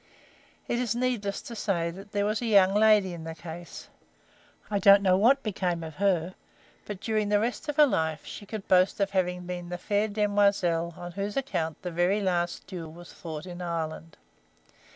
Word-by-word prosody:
It 240 - 0
is 240 -3 -1
needless 240 -5 -1
to 235 - -8
say 170 -6 -1
that 195 +4 -12
there 205 -1 0
was 210 +2 -1
a 240 - -2
young 195 -3 +5
lady 210 -3 +4
in 165 -2 -8
the 165 0 -6
case; 170 +1 -9 0.8
I 205 - +1
don't 200 +1 +7
know 185 -2 +4
what 250 +8 +4
became 180 -5 -2
of 160 -2 -8
her, 185 -3 +1 0.5
but 205 -3 -6
during 215 -1 -1
the 205 0 +3
rest 245 +7 -3
of 295 - -2
her 300 0 +7
life 160 - -1
she 205 - -9
could 215 -2 -6
boast 185 +2 +3
of 200 -1 +1
having 180 -2 -1
been 175 -1 -6
the 175 - -4
fair 205 +4 0
demoiselle 200 -5 +1
on 175 0 -7
whose 200 +4 -4
account 165 - -2
the 180 - -4
very 175 +4 +2
last 175 -3 -1
duel 175 -4 -7
was 175 +2 -13
fought 160 -2 -7
in 180 -1 -8
Ireland. 165 -2 -4
190 Hz, 195 wpm, -27 LUFS, 175-210 Hz, 0.8 s, don't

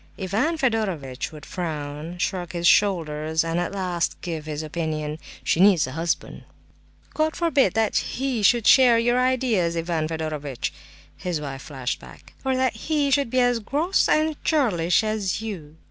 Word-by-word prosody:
Ivan 220 - 0
Fedorovitch 195 - -1
would 150 -2 -11
frown, 155 -1 -5
shrug 180 -1 -2
his 170 0 -3
shoulders, 160 -5 +2
and 165 +1 -1
at 175 - -2
last 180 -3 -2
give 160 -3 -5
his 155 0 -4
opinion: 155 -1 -3 0.2
"She - - +1
needs 190 -4 +5
a 130 - -7
husband!" 165 +4 -3 0.7
"God 315 0 0
forbid 290 - +2
that 225 -1 +2
he 260 -3 -1
should 230 +2 +4
share 250 -3 +7
your 240 +2 +2
ideas, 240 -10 +1
Ivan 165 -2 -1
Fedorovitch!" 155 -5 -4 0.4
his 180 -4 -3
wife 135 -2 -6
flashed 135 -3 -4
back. - - -15
"Or 265 -1 +1
that 260 -1 +1
he 290 +2 0
should 280 -2 +2
be 255 +2 +2
as 245 -1 +2
gross 300 - +1
and 310 0 +1
churlish 215 - +2
as 215 -3 -1
you!" 180 -9 -7
180 Hz, 160 wpm, -24 LUFS, 160-245 Hz, 0.7 s, share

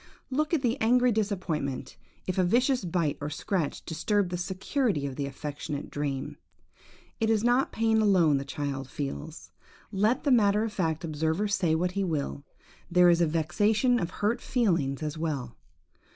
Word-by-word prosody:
Look 305 +4 0
at 320 -5 +1
the 240 +2 0
angry 245 +2 +4
disappointment, 175 - -2 0.3
if 185 0 -2
a - - +4
vicious 250 +6 +2
bite 165 -4 -1
or 145 - -3
scratch 160 0 -2
disturb 190 +4 0
the 180 - -3
security 190 - -1
of 135 -2 -4
the 140 0 -2
affectionate 145 +1 -6
dream. 140 -2 -3 0.8
It 225 -1 +1
is 220 -1 +2
not 245 +3 +2
pain 225 0 +2
alone 180 -8 +4
the - - -4
child 140 -2 -4
feels, 150 +3 -6 0.4
let 215 +5 +1
the 285 - +2
matter 210 -3 +4
of 225 -2 -3
fact 165 -3 -1
observer 160 +5 -1
say 190 -6 +1
what 180 +2 0
he 200 +1 -1
will; 150 -5 -2 0.5
there 180 0 +6
is 170 - +3
the 170 - +3
vexation 205 - +2
of 170 - -2
hurt 210 +5 -1
feelings 165 - 0
as 150 0 -4
well. 140 -7 -3
180 Hz, 165 wpm, -28 LUFS, 150-220 Hz, 0.8 s, there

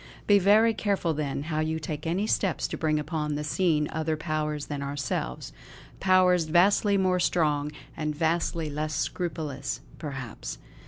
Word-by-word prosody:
Be 205 -1 +6
very 215 +4 +5
careful, 200 -6 0
then, 145 -2 -2
how 155 0 -2
you 160 +1 0
take 155 0 -5
any 185 +5 0
steps 195 -5 0
to - - -3
bring 155 -1 +1
upon 150 0 -2
the 150 - -2
scene 150 -1 +1
other 160 0 -1
powers 150 -1 -2
than 145 -1 -4
ourselves; 140 - -3 0.5
powers 185 -2 +4
vastly 200 +5 +4
more 185 -1 +2
strong, 150 -4 +1 0.2
and 155 -2 -2
vastly 165 0 0
less 150 +1 -3
scrupulous 155 -6 -3 0.2
perhaps." 130 - -6
155 Hz, 150 wpm, -27 LUFS, 150-180 Hz, 0.5 s, Be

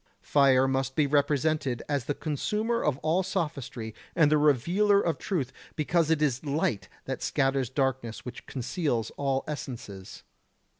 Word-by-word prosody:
Fire 135 -2 +4
must 135 0 -1
be 150 - +3
represented 145 -2 +1
as 140 -4 -1
the 145 - -1
consumer 210 - -1
of 145 -3 +1
all 160 +4 +2
sophistry 140 - -3 0.2
and 155 -4 +4
the 155 - +5
revealer 170 - +3
of 165 -4 0
truth, 140 - -2 0.2
because 160 +1 +1
it 160 -2 +2
is 130 -2 0
light 140 -8 -1 0.2
and - - -4
scatters 135 -3 +1
darkness 130 -4 -2
which 125 -1 -8
conceals 125 - -2
all 135 -1 -1
essences. 115 -10 -7
145 Hz, 145 wpm, -28 LUFS, 130-155 Hz, 0.2 s, the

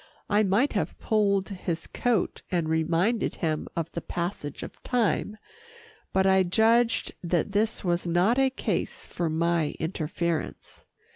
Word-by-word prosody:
I 205 +1 +5
might 215 +7 +2
have - - -2
pulled 200 -3 +1
his 180 -4 -4
coat 240 -6 0
and 170 -3 0
reminded 165 +8 +1
him 155 -3 -2
of 165 -1 -2
the 170 - -4
passage 170 -5 -4
of - - -10
time, 225 -3 0 0.7
but 190 0 +2
I 190 0 +5
judged 225 +5 +3
that 175 +2 0
this 215 +3 0
was 175 -1 0
not 180 +9 +3
a 270 0 +4
case 260 - -3
for 170 -2 -2
my 160 -1 +1
interference. 165 0 -3
185 Hz, 140 wpm, -27 LUFS, 170-215 Hz, 0.7 s, I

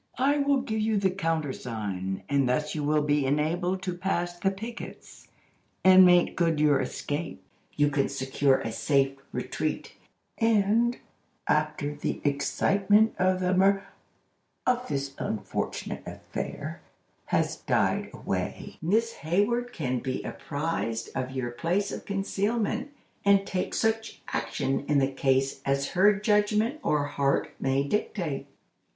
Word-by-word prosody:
I 280 +4 +3
will 280 -1 +2
give 220 -4 -2
you 215 0 +1
the 195 -2 +2
counter 165 -6 -1
sign, 95 -5 -4
and 140 -3 +2
thus 150 +4 0
you 150 - -2
will 150 +1 +2
be 145 -1 +2
enabled 175 +6 0
to 185 -2 -2
pass 175 -1 -1
the 185 +2 +1
pickets, 225 +5 -8 0.6
and 185 0 +9
make 180 -1 +5
good 165 -3 +1
your 145 -3 +4
escape. 145 +5 -4 0.3
You 145 0 +3
can 140 -1 +1
secure 135 0 +1
a 115 - -3
safe 135 +4 +1 0.2
retreat, - - -3 0.5
and, 225 +2 +3 0.5
after 150 -1 0
the 145 - -3
excitement 195 +9 +3
of 185 0 +2
the 180 0 +1
mur—of 200 +5 -1
this 140 -1 -2
unfortunate 110 - -3
affair—has - - -4
died - - +1
away, - - -4
Miss 225 +8 +1
Hayward 220 +9 0
can 130 - -2
be 130 +1 -3
apprised 135 -5 -3
of 130 -1 -2
your 130 -2 -3
place 175 +11 -1
of - - -6
concealment, 210 +6 -1 0.3
and 200 -1 +4
take 185 -2 -2
such 225 0 0
action 115 +4 -1
in 150 - +3
the 135 0 +2
case 135 0 +1
as 140 0 0
her 195 +3 +5
judgment 210 +5 +2
or 150 -1 +1
heart 140 -1 0
may 135 +1 +1
dictate." 165 -2 -2
165 Hz, 135 wpm, -27 LUFS, 140-200 Hz, 0.6 s, and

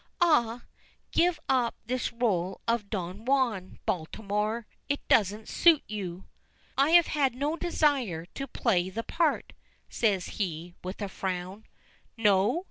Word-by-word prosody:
Ah! 245 -9 +3 0.5
give 345 -2 +3
up 250 -3 +2
this 250 +2 -1
role 195 -7 0
of 230 -3 0
Don 190 0 -4
Juan, 240 -8 0
Baltimore. 210 +6 -2 0.2
It 285 - -2
doesn't 210 +1 +2
suit 330 -4 +5
you." 190 -4 -5 0.5
"I 275 +2 +3
have 340 - +4
had 275 -5 +1
no 290 +5 -1
desire 275 - +1
to 275 - -5
play 185 -10 +1
the 225 +5 -4
part," 325 +2 0 0.4
says 200 -6 +1 0.2
he, 175 -2 -3
with 185 +3 -5
a - - -1
frown. 190 +2 -4 0.5
"No? 205 - +3
220 Hz, 130 wpm, -28 LUFS, 190-270 Hz, 0.5 s, suit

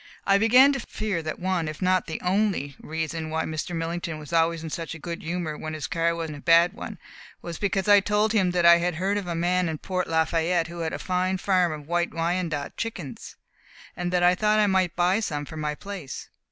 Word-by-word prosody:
I 200 0 +4
began 250 +6 +6
to 275 - -2
fear 215 -7 -3
that 155 -1 -4
one, 185 -3 -1
if 155 - -6
not 185 -1 +2
the 160 - -4
only, 180 -7 0
reason 160 0 -4
why 160 0 -1
Mr. 160 +2 -4
Millington 165 0 -3
was 155 +2 -10
always 165 0 +2
in 160 - -6
such 165 0 -4
a - - -7
good 170 +2 -6
humour 165 -2 -3
when 155 +1 -5
his 155 - -4
car 170 0 0
was 165 -1 -3
in 155 - -6
a - - -9
bad 170 +4 +5
one, 215 -2 -7 0.5
was 170 -2 -6
because 195 -1 0
I 205 - +7
had - - -23
told 210 +1 +2
him 190 -5 +3
that 175 -1 +1
I 170 0 +9
had 175 0 -1
heard 195 +4 0
of 195 - -7
a 170 - -2
man 175 +1 +1
in 160 - -3
Port 185 +3 -3
Lafayette 165 +1 +1
who 170 0 -8
had 160 -1 -2
a - - -2
fine 185 +1 -1
farm 185 -2 +2
of 150 -2 -7
White 175 0 -1
Wyandotte 165 -3 -2
chickens, 175 - -6 0.6
and 180 0 -3
that 180 -1 +2
I 180 0 +6
thought 210 +3 +2
I 215 - +4
might 190 -3 +1
buy 180 +3 +2
some 145 -9 -3
for 160 - -10
my 150 -1 -2
place. 190 -6 -8
175 Hz, 235 wpm, -25 LUFS, 160-185 Hz, 0.6 s, I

